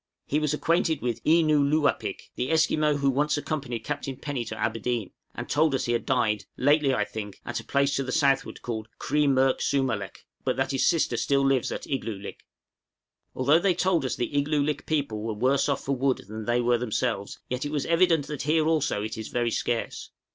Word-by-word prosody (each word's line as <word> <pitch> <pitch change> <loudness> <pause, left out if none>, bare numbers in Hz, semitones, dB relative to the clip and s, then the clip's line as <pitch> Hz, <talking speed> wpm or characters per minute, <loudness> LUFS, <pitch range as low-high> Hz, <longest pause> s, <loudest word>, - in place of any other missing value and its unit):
He 150 - 0
was 150 -2 0
acquainted 160 0 +1
with 120 -2 -2
Ee 165 +2 +5
noo 150 -2 +3
lōō 145 +1 +3
apik, - - -7
the 125 +2 -2
Esquimaux 155 -2 +2
who 140 -1 +2
once 150 +3 +1
accompanied 135 -6 -3
Captain 135 +3 -4
Penny 145 -5 -3
to - - -6
Aberdeen, 115 -1 -2 0.2
and - - -5
told 150 -1 +2
us - - -1
he 120 - -1
had 120 - -2
died, 105 -5 +1
lately 145 +1 +3
I 105 -5 +1
think, 105 -2 -7
at - - -3
a - - -9
place 140 0 +1
to 135 - 0
the 130 - -4
southward 140 -3 +1
called 110 -2 -4
Kri 150 0 +1
merk 135 -1 +3
sū 140 -1 +1
malek, 105 -7 -4 0.2
but - - -1
that 135 +1 0
his 135 - +2
sister 165 -3 +2
still 140 -1 +2
lives 135 -2 +2
at - - -4
Igloolik. 135 -2 -2
{BARTER 110 -3 -3
WITH 100 - -11
NATIVES.} - - -8 0.9
Although 140 +5 +4
they 185 0 +2
told 185 -5 +1
us 130 - -1
the 120 - -3
Igloolik 145 0 0
people 140 -9 -1
were 110 0 -3
worse 135 +6 +2
off 140 -1 -1
for 140 - 0
wood 130 0 0
than 110 +1 -6
they 120 +2 +2
were 120 0 +2
themselves, 105 -4 -2
yet 125 0 -3
it 145 - -3
was 150 -2 -1
evident 165 -3 +3
that 150 -2 -5
here 155 +2 +2
also 150 -9 +1
it 110 +1 -5
is 110 - -5
very 120 -1 -1
scarce. 115 +1 -2
135 Hz, 220 wpm, -26 LUFS, 120-150 Hz, 0.9 s, Ee